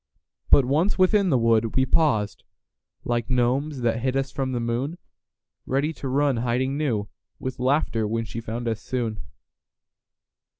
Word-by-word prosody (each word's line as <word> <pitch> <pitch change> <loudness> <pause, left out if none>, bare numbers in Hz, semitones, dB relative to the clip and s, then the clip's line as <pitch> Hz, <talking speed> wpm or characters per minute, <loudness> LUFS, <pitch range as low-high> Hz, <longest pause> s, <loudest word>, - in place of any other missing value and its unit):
But 140 - +6
once 155 +10 +1
within 190 +1 +4
the 135 - +3
wood, 115 -1 +2
we 130 - +3
pausedLike 120 -3 -2
gnomes 130 +3 0
that 115 -1 +1
hid 130 +1 0
us 135 0 -1
from 135 -2 -2
the 125 - -1
moon, 120 +8 -2 0.7
Ready 140 +4 0
to 140 - -6
run 140 0 +2
to - - -1
hiding 125 +3 0
newWith 120 -3 -4
laughter 125 -4 +1
when 115 +1 -1
she 115 +1 -6
found 115 +2 -5
us 110 -1 -2
soon. 115 -4 -3
125 Hz, 145 wpm, -24 LUFS, 115-140 Hz, 0.7 s, But